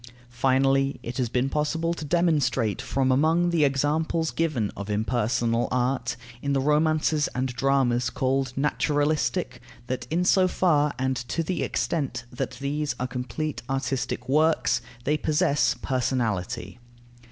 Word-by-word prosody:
Finally, 135 Hz, +2 st, +2 dB
it 120 Hz, +1 st, -5 dB
has 125 Hz, -3 st, 0 dB
been 125 Hz, +3 st, +1 dB
possible 155 Hz, +4 st, 0 dB
to 165 Hz, -, -7 dB
demonstrate 150 Hz, -, +1 dB
from 135 Hz, -1 st, 0 dB
among 160 Hz, +6 st, +3 dB
the 165 Hz, -3 st, +3 dB
examples 150 Hz, +4 st, +1 dB
given 150 Hz, -11 st, -1 dB
of 100 Hz, +1 st, -6 dB
impersonal 115 Hz, +2 st, 0 dB
art, 125 Hz, -1 st, 0 dB, 0.3 s
in 140 Hz, 0 st, -1 dB
the 135 Hz, -, +2 dB
romances 150 Hz, +1 st, +2 dB
and 130 Hz, +1 st, 0 dB
dramas 125 Hz, -1 st, +1 dB
called 130 Hz, 0 st, 0 dB
naturalistic, 145 Hz, -3 st, 0 dB, 0.2 s
that 130 Hz, +1 st, -4 dB
in 175 Hz, +3 st, 0 dB
so 185 Hz, 0 st, +4 dB
far 150 Hz, -5 st, +2 dB
and 130 Hz, 0 st, 0 dB
to 125 Hz, +7 st, -2 dB
the 180 Hz, +3 st, -2 dB
extent 140 Hz, -6 st, -2 dB
that 125 Hz, +1 st, -4 dB
these 145 Hz, -1 st, -2 dB
are 125 Hz, -, -1 dB
complete 125 Hz, +4 st, -4 dB
artistic 135 Hz, -2 st, -2 dB
works, 155 Hz, +2 st, +2 dB, 0.2 s
they 150 Hz, +4 st, +1 dB
possess 150 Hz, -2 st, +2 dB
personality. 120 Hz, -4 st, -2 dB
135 Hz, 135 wpm, -26 LUFS, 125-150 Hz, 0.3 s, so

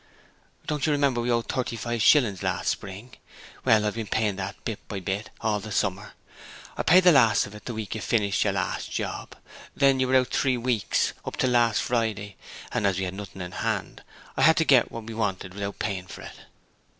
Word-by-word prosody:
'Don't 150 Hz, -1 st, -1 dB
you -, -, +2 dB
remember 140 Hz, -4 st, +2 dB
we 120 Hz, -, -2 dB
owed 120 Hz, -1 st, +1 dB
thirty 125 Hz, -2 st, -2 dB
five 120 Hz, +1 st, -3 dB
shillings 115 Hz, -, +4 dB
last -, -, -1 dB
spring? 105 Hz, +6 st, -5 dB, 0.5 s
Well, 110 Hz, -1 st, +4 dB
I've 105 Hz, -, 0 dB
been 115 Hz, -2 st, -5 dB
paying 105 Hz, 0 st, 0 dB
that 95 Hz, +1 st, -4 dB
bit 110 Hz, -3 st, -3 dB
by 100 Hz, -, -4 dB
bit 95 Hz, +3 st, -3 dB
all 110 Hz, -2 st, 0 dB
the 110 Hz, +2 st, -8 dB
summer. 100 Hz, +1 st, -1 dB, 0.6 s
I -, -, -2 dB
paid 185 Hz, +3 st, +6 dB
the 180 Hz, -, +8 dB
last 115 Hz, -6 st, +5 dB
of 105 Hz, -, -11 dB
it 105 Hz, -, -12 dB
the 120 Hz, -, -5 dB
week 110 Hz, -2 st, -4 dB
you 110 Hz, -, -5 dB
finished 100 Hz, -4 st, +1 dB
your -, -, 0 dB
last -, -, -3 dB
job. -, -, -4 dB, 0.4 s
Then 135 Hz, -1 st, +4 dB
you 130 Hz, -, +2 dB
were 130 Hz, -, +2 dB
out 130 Hz, -1 st, +3 dB
three 130 Hz, -3 st, +1 dB
weeks 120 Hz, -4 st, 0 dB
up -, -, -6 dB
till 130 Hz, -, +1 dB
last 120 Hz, -3 st, +3 dB
Friday 110 Hz, -4 st, -2 dB, 0.4 s
and 100 Hz, -, +1 dB
as 95 Hz, -2 st, 0 dB
we 95 Hz, -, -1 dB
had 90 Hz, -, -4 dB
nothing 95 Hz, -1 st, -7 dB
in 90 Hz, -, -7 dB
hand -, -, -3 dB, 0.3 s
I -, -, -1 dB
had 160 Hz, -, +6 dB
to 160 Hz, -, +3 dB
get 130 Hz, -6 st, +4 dB
what 115 Hz, -, -7 dB
we 115 Hz, +1 st, -8 dB
wanted 95 Hz, -4 st, -3 dB
without 100 Hz, 0 st, -5 dB
paying 95 Hz, -3 st, -3 dB
for -, -, -10 dB
it.' -, -, -10 dB
110 Hz, 220 wpm, -26 LUFS, 100-125 Hz, 0.6 s, the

